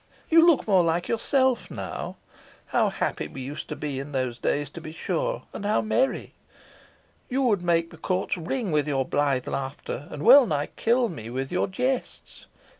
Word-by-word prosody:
You 330 +1 +7
look 330 -8 +4
more 190 -4 +5
like 170 +1 0
yourself 260 +2 +1
now. - - -5 0.5
How - - +2
happy - - -2
we 135 - -8
used 140 +3 -6
to - - -3
be 145 -3 -4
in 140 +2 -7
those 130 -2 -2
days, 145 0 -1
to 170 - -9
be 155 - -8
sure! - - -2
and - - -6
how 210 +1 +2
merry! 240 +5 0 1.0
You 270 +1 0
would 210 -7 +2
make 170 -1 +1
the - - -12
courts 185 0 -1
ring 195 +5 -3
with 150 -1 +1
your 135 -3 0
blithe 140 -3 0
laughter, 135 +1 -4
and 150 0 -6
wellnigh 230 - +6
kill 240 +1 +2
me 130 - -7
with 135 +2 -4
your 180 - +1
jests. 250 +7 -3
170 Hz, 180 wpm, -26 LUFS, 145-240 Hz, 1.0 s, You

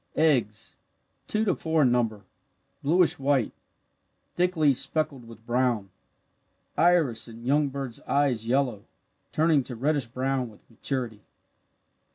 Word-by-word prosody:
Eggs 125 -10 +1 0.5
two 215 +1 0
to 190 - +3
four 160 -2 +1
in 125 - +4
number, 115 -4 0 0.6
bluish 170 +3 +3
white, 135 -4 +1 0.8
thickly 170 -5 +3
speckled 135 -2 -2
with 115 -1 -14
brown. 120 -5 0 0.8
Iris 165 -10 +3
in 115 +1 -11
young 145 +3 +3
bird's 135 -3 -5
eyes 130 -6 +1
yellow 125 -5 0 0.5
turning 155 -2 +3
to 125 -1 -6
reddish 140 +1 0
brown 130 +1 -1
with 105 - -19
maturity. 115 -2 -3
130 Hz, 120 wpm, -27 LUFS, 115-150 Hz, 0.8 s, in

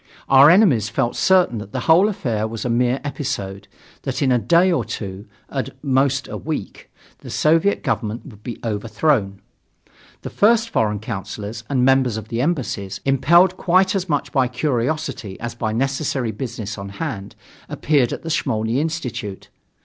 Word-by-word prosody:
Our 135 +2 +8
enemies 160 - +4
felt 120 +2 -1
certain 180 - +3
that 105 0 -10
the 130 - -2
whole 175 +8 +5
affair 115 - -2
was 115 +1 -6
a 120 - 0
mere 125 +2 +1
episode, 100 -9 -4 0.3
that - - -2
in 130 - +2
a 125 - +3
day 175 +8 +3
or 155 -9 +1
two 100 -3 -6 0.2
at 135 -2 -4
most 135 -1 +1
a - - -6
week 155 -10 -6 0.3
the - - -11
Soviet 165 +6 +2
Government 110 0 -2
would 105 -7 -13
be 120 +1 -6
overthrown. 105 -1 0 0.8
The - - -6
first 230 +2 +3
foreign 105 -2 +1
councillors 105 +1 -6
and 130 -3 +2
members 130 -4 +3
of 110 0 -7
the 115 +1 -1
embassies, 115 - -2
impelled 170 +7 +4
quite 185 +2 +3
as 190 -2 -2
much 145 -2 -1
by 130 -2 +2
curiosity 130 -4 -2
as 120 0 -5
by 115 -2 -2
necessary 135 0 -1
business 110 -2 -6
on 100 0 -6
hand, 110 -12 -5 0.3
appeared 140 -6 +1
at - - -5
the 165 - -4
Smolny 110 -4 0
Institute. 135 - -4
125 Hz, 165 wpm, -21 LUFS, 110-155 Hz, 0.8 s, Our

